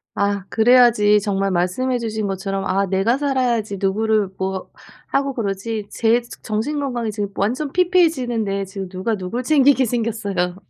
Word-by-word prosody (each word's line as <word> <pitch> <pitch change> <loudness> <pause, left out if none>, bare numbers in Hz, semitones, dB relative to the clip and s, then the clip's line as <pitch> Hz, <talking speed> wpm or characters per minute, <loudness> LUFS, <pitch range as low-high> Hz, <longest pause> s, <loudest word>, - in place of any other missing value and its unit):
아 200 -1 0
그래야지. 225 -3 +5
정말 195 -1 -1
말씀해 185 +9 0
주신 220 -2 -3
것처럼 195 0 -3
'아 195 +1 +1
내가 195 +7 +1
살아야지 250 -7 0
누구를 210 +1 +1
뭐 190 0 -3 0.4
하고 275 0 0
그러지.' 210 -1 -3
제 235 +1 +2 0.2
정신 225 +8 -2
건강이 245 -6 -2
지금 205 -1 -3
완전 255 +8 -1
피폐해지는데 255 - +1
지금 190 0 -7
누가 190 +4 -2
누굴 210 +6 -4
챙기게 270 -1 +4
생겼어요. 210 -6 -2
220 Hz, 335 characters per minute, -20 LUFS, 195-245 Hz, 0.4 s, 그래야지